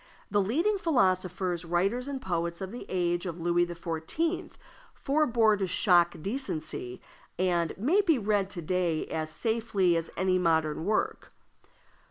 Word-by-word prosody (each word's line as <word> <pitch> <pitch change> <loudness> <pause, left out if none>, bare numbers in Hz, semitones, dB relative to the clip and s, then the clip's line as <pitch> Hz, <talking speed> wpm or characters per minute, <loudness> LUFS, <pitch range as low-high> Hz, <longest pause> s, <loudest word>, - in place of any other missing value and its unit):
The 205 0 +3
leading 335 - +1
philosophers, 185 - +1
writers, 195 +9 0
and 280 -2 -3
poets 170 -5 -2
of 190 -1 -5
the 245 - -8
age 175 0 0
of 170 0 -5
Louis 175 +1 +2
XIV. 170 - -3 0.4
forbore 240 -7 +2
to 190 - 0
shock 175 -2 +3
decency, 160 - -4 0.4
and 175 -2 0
may 305 - +3
be 335 -7 +3
read 205 -3 0
to 175 -4 -6
day 175 -2 0
as 155 -1 -3
safely 220 -3 +1
as 165 0 -2
any 185 0 +2
modern 160 -2 +1
work. 215 +2 -1
185 Hz, 140 wpm, -29 LUFS, 170-230 Hz, 0.4 s, The